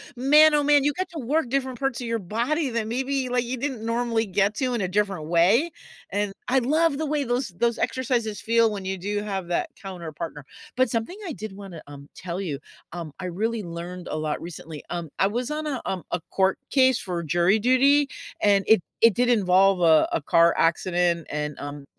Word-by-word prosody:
man, 300 +5 +6
oh, 295 - +2
man, 290 -1 +4
you 295 - +2
get 370 +4 -3
to 330 - -6
work 275 +2 0
different 260 -1 -2
parts 270 -3 -1
of 240 - -4
your 230 0 0
body 240 - -1
than 230 -2 -2
maybe, 260 +2 -1
like, 245 0 +1
you 250 +2 -4
didn't 250 -4 -4
normally 230 -1 0
get 200 +1 +1
to 255 -1 -1
in 235 - -1
a 185 - 0
different 195 -4 -1
way, 185 - +3 0.4
and 205 0 -2
I 265 +2 +3
love 300 +4 +2
the 315 - -2
way 300 -1 0
those 245 0 -1
those 235 +6 0
exercises 235 -5 -1
feel 230 0 +3
when 200 -2 -5
you 190 0 -2
do 205 +3 -2
have 195 -4 -4
that 175 - -1
counter 180 -5 -7
partner. 150 -3 -7 0.3
But 255 -1 +3
something 230 - -3
I 325 - -4
did 215 -4 -7
wanna, 195 -5 -9
um, 140 0 -11
tell 180 0 -5
you, 150 -8 -4 0.3
um, 170 -3 -6
I 185 - -5
really 215 +6 -2
learned 175 +1 -7
a - - -3
lot 155 -1 -2
recently, 160 -3 -8
um, 170 -2 -4
I 195 - +4
was 240 +6 -3
on 305 0 -3
a, 275 -4 -2
um 185 -2 -3
a 175 - 0
court 190 0 +2
case 260 -2 +4
for 175 -3 -4
jury 175 +6 +2
duty, 275 +5 +4 0.3
and 200 -1 +4
it 220 -4 +5 0.2
it 230 -1 +6
did 245 +4 +1
involve 195 -4 +4
a 160 -2 +5
a - - 0
car 170 +3 +4
accident 170 0 +1
and, 150 0 -4
um, 145 0 -7
215 Hz, 215 wpm, -25 LUFS, 175-255 Hz, 0.4 s, man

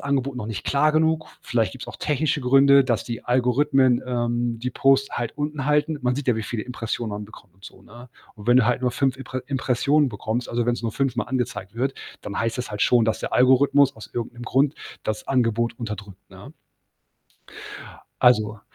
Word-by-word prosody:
Angebot 140 -1 -1
noch 120 -4 -5
nicht 110 -4 -5
klar 145 +2 +2
genug. 160 0 +1
Vielleicht 115 -5 0
gibt's 130 - -9
auch - - -9
technische 150 +1 0
Gründe, 135 +2 +6
dass 120 -4 -1
die 120 -2 -6
Algorithmen, 130 +1 +2
ähm, 120 -1 -1
die 125 +2 -3
Posts 135 +1 +2
halt 120 +3 -4
unten 145 -2 -3
halten.“ 150 +1 +1
Man 125 0 +1
sieht 145 - -4
ja, 125 - +3
wie 110 - -3
viele 110 0 -4
Impressionen 115 -2 -4
man 105 0 -5
bekommt, 100 -2 -17
so, - - -12
ne? 120 +3 -14 0.3
Und 105 -1 -13
wenn 120 - +6
du 125 -3 +5
halt 125 +1 +1
nur 125 - +2
5 130 +1 0
Impre 130 -1 -6
Impressionen 135 +2 +1
bekommst, 115 +2 -3
also, 120 0 -1
wenn's 120 0 0
nur 115 - -1
fünfmal 130 -5 -1
angezeigt 120 -5 -3
wird, 135 +3 -1 0.3
dann 100 - -6
heißt 115 0 -1
das 125 - -4
halt 105 - -2
schon, 120 -2 +4
dass 110 0 -1
der - - -5
Algorithmus, 130 +3 +4
aus 110 - -12
irgend 120 -1 -4
'nem 120 0 -11
Grund 135 +3 +1 0.3
das 110 0 -4
Angebot 115 -2 0
unterdrückt, 105 -4 -7
ne? - - -13 1.7
Also, 110 -3 +3
125 Hz, 195 wpm, -23 LUFS, 115-135 Hz, 1.7 s, Gründe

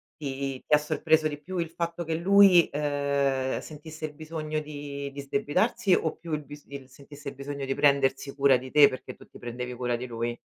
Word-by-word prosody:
ti 135 -3 -4
ti - - -21
ha - - +6
sorpreso 155 +1 +2
di 145 -1 -6
più 185 +3 -6
il 165 -2 -2
fatto 170 0 -3
che 165 - -3
lui 185 0 +6
eh 140 -2 0
sentisse 155 +1 -8
il 150 - -7
bisogno 155 0 -4
di 145 -2 -6
di 140 - -9
sdebitarsi 190 - +1
o 160 - -1
più 170 -2 -10
il 150 -1 -2
bis 145 +1 -11
il 140 -2 -9
sentisse 140 +1 -10
il - - -12
bisogno 140 0 -5
di 135 - -1
prendersi 140 -1 +2
cura 140 -1 +5
di 130 +1 -9
te 145 +1 +7
perché 130 -1 -7
tu - - -16
ti - - -15
prendevi 125 +1 -5
cura 125 0 -1
di 120 +2 -5
lui? 120 0 -3
145 Hz, 210 wpm, -27 LUFS, 135-155 Hz, -, te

